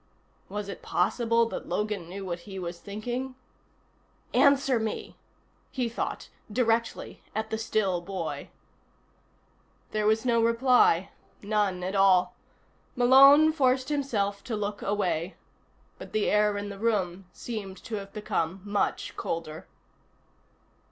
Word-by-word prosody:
Was 205 +1 -4
it 200 - -7
possible 230 -1 +1
that - - -6
Logan 210 -5 -2
knew 195 +2 -6
what 175 -2 -4
he 190 - -7
was 175 -2 -5
thinking? 240 +7 -5 1.0
Answer 275 -3 +4
me, 220 -1 -4 0.5
he 255 -3 -2
thought, 230 - -4 0.2
directly 230 0 0
at 220 0 -3
the 220 - 0
still 200 -5 0
boy. 190 +2 -5 1.4
There 215 -1 0
was 220 +2 +2
no 235 -2 +3
reply, 230 -6 +3 0.3
none 200 -3 0
at 185 +2 -3
all. 195 -2 +4 0.6
Malone 275 +5 +7
forced 260 -3 +1
himself 215 -9 -1
to 235 - -3
look 205 0 -3
away. 190 -3 -1 0.6
But - - -10
the 215 - +1
air 210 0 +3
in 205 0 -4
the 200 -1 -8
room 195 -5 -1
seemed 200 -4 -6
to 220 - -4
have 195 -1 -8
become 190 -4 -2
much 205 0 -1
colder. 160 -2 -5
210 Hz, 125 wpm, -28 LUFS, 195-235 Hz, 1.4 s, Malone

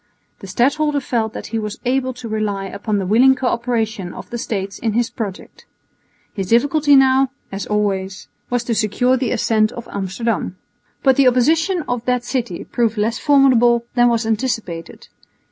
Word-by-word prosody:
The 195 - -10
stadholder 285 +8 +1
felt 230 -4 -2
that - - -7
he 225 - 0
was 210 -1 -5
able 260 +1 0
to 245 -1 -8
rely 210 -3 -2
upon 205 +2 -3
the 195 - -2
willing 245 +7 +5
co 260 - -5
operation 225 -6 -1
of - - -10
the 240 - -4
States 200 -3 -4
in 225 -2 -1
his 235 +1 0
project. 200 -5 -7 0.7
His 195 -3 -4
difficulty 285 +5 +4
now, 265 0 +4 0.2
as 195 +1 -5
always, 195 -2 -2 0.2
was 245 -1 0
to 235 - -1
secure 225 +4 +1
the 260 -1 -1
assent 215 -1 +1
of 235 -1 -8
Amsterdam. 195 0 -3 0.5
But 265 -2 +4
the 275 -2 +5
opposition 320 +8 +2
of 245 -2 -2
that 250 -1 0
city 240 -8 -3
proved 230 -2 -1
less 225 +3 0
formidable 245 -5 +4
than 240 -1 +4
was 230 -1 0
anticipated. 220 -7 -3
235 Hz, 170 wpm, -19 LUFS, 210-255 Hz, 0.7 s, willing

